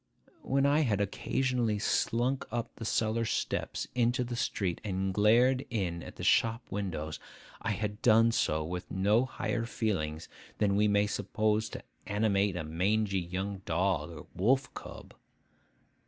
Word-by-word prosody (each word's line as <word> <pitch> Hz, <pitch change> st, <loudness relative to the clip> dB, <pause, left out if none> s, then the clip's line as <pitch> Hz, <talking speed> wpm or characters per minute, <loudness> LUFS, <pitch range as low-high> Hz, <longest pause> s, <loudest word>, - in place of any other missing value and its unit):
When 135 Hz, +1 st, +1 dB
I 145 Hz, +2 st, +4 dB
had 115 Hz, -10 st, +1 dB
occasionally 115 Hz, +2 st, 0 dB
slunk 120 Hz, +5 st, 0 dB
up 120 Hz, -1 st, -3 dB
the 115 Hz, -, -6 dB
cellar 110 Hz, +1 st, +1 dB
steps 115 Hz, -, -2 dB
into 120 Hz, +1 st, +2 dB
the 120 Hz, 0 st, -4 dB
street, 95 Hz, -6 st, -1 dB
and 95 Hz, -2 st, -1 dB
glared 120 Hz, +6 st, +4 dB
in 90 Hz, -7 st, -2 dB
at -, -, -7 dB
shop 115 Hz, +1 st, +3 dB
windows, 80 Hz, -7 st, -3 dB, 0.4 s
I 115 Hz, -, -2 dB
had 105 Hz, +1 st, -4 dB
done 115 Hz, 0 st, +5 dB
so 80 Hz, -8 st, +1 dB
with 90 Hz, +3 st, -5 dB
no 105 Hz, +6 st, +2 dB
higher 120 Hz, -2 st, -2 dB
feelings 80 Hz, -10 st, -2 dB, 0.3 s
than 100 Hz, -2 st, +2 dB
we 105 Hz, +1 st, +4 dB
may 100 Hz, 0 st, +3 dB
suppose 105 Hz, +2 st, 0 dB
to -, -, -8 dB, 0.2 s
animate 100 Hz, -2 st, +1 dB
a 90 Hz, -, -3 dB
mangy 95 Hz, +5 st, +1 dB
young 95 Hz, +3 st, -4 dB
dog 90 Hz, +2 st, 0 dB
or 80 Hz, -3 st, -9 dB
wolf 130 Hz, +8 st, +1 dB
cub. -, -, -10 dB
105 Hz, 145 wpm, -31 LUFS, 95-115 Hz, 0.4 s, done